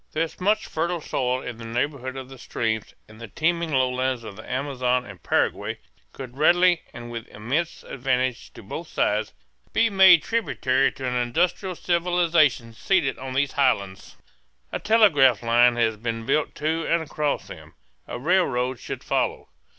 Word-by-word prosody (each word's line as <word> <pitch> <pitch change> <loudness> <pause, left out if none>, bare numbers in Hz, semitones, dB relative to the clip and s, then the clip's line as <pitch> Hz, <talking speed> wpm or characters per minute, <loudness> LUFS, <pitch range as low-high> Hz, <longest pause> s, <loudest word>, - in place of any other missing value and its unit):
There 155 - +1
is 165 - -7
much 210 +3 +2
fertile 170 +2 -2
soil 130 -3 -2
in 120 -2 -6
the 115 - -10
neighborhood 130 +3 -3
of 130 -1 -7
the 135 -1 -13
streams, 110 -3 -3
and 110 +1 -15
the 115 - -7
teeming 170 - -1
lowlands 130 -2 0
of 110 -3 -9
the 110 - -11
Amazon 125 -2 0
and 100 -5 -11
the - - -39
Paraguay - - 0 0.3
could 130 - -10
readily 175 +2 +4
and 120 -1 -9
with 115 -1 -6
immense 135 +11 -3
advantage 130 -1 -2
to - - -12
both - - -7
sides - - 0 0.4
be 230 -1 +3
made 190 -4 +7
tributary 135 - +1
to 130 - -5
an 125 - -1
industrial 170 +10 0
civilization 170 -9 +1
seated 160 - 0
on 130 0 -6
these 140 0 +1
highlands. 100 -9 -1 0.5
A - - -3
telegraph 155 - +4
line 120 +1 +4
has 110 -2 +1
been 115 0 -4
built 145 +4 0
to 160 +2 -1
and 165 -1 +1
across 150 -1 -2
them. - - -12 0.3
A - - -5
rail 175 +8 +3
road 125 -1 -2
should - - -7
follow. - - -1
130 Hz, 170 wpm, -24 LUFS, 120-165 Hz, 0.5 s, made